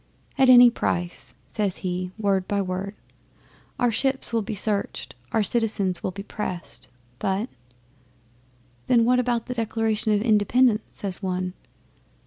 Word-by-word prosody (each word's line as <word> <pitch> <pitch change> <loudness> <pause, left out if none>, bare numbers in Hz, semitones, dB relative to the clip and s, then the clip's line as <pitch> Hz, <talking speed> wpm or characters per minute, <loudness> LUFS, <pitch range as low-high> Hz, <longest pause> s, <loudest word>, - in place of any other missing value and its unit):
'"At 265 -2 +4
any 245 -1 +9
price," 175 -6 -3
says 205 -4 -1
he, 180 0 -2
word 195 -3 0
by 205 - 0
word. 190 +1 -3 0.8
"Our 245 -1 +2
ships 265 +2 0
will 230 - +2
be 215 +1 -4
searched 205 0 -2 0.2
our 220 - +2
citizens 205 -4 0
will - - -2
be 195 +2 -7
pressed, 185 -5 -6 0.3
but 200 +5 -1 0.7
" 120 +2 -35 0.4
'"Then 235 -2 +4
what 250 +1 +4
about 240 -2 0
the 250 - -4
Declaration 225 -1 0
of 210 0 +2
Independence?" 220 +1 +3
says 195 -2 -3
one. 185 -1 -2
210 Hz, 140 wpm, -24 LUFS, 185-230 Hz, 0.8 s, any